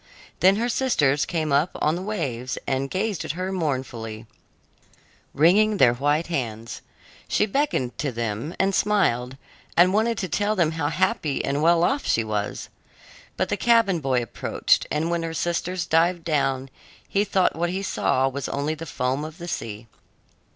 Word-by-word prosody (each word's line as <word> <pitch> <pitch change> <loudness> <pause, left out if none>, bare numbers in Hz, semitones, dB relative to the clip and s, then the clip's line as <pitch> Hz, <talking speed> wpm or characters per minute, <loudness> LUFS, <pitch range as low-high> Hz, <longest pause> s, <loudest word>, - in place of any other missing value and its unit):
Then 190 +1 +5
her 230 +3 0
sisters 150 - +1
came 160 -3 -1
up 145 +5 +3
on 155 +2 +2
the 175 - -4
waves 140 - -3
and 135 +1 -1
gazed 195 0 -2
at - - -3
her 185 +3 -3
mournfully, 130 - -3 1.1
wringing 205 +8 +4
their 125 -7 +5
white 145 +6 +1
hands. 115 -8 -4 0.5
She - - +2
beckoned 210 - -1
to 145 - -1
them, 115 +6 -4
and 195 +1 +2
smiled, 135 - +1 0.4
and 180 +2 +6
wanted 225 +2 +1
to 195 -4 -2
tell 205 +5 0
them 170 -5 +2
how 160 -2 -2
happy 150 -2 0
and 140 +1 -1
well 170 +1 +4
off 275 +8 +1
she 115 - +2
was. 105 -1 -3 0.7
But - - 0
the - - 0
cabin 230 -7 +3
boy 130 -4 0
approached, 115 - 0
and 155 +3 -1
when 170 -1 0
her 165 0 -4
sisters 175 +2 -1
dived 170 +1 +2
down, 135 -4 0 0.4
he 200 - +1
thought 195 -3 +1
what 170 +1 -1
he 190 +2 -3
saw 135 -8 +1
was 135 +1 -4
only 145 +2 -1
the 160 +1 -8
foam 130 +2 -1
of 155 +1 -8
the 175 -1 -8
sea. 110 -8 -5
160 Hz, 170 wpm, -24 LUFS, 135-185 Hz, 1.1 s, and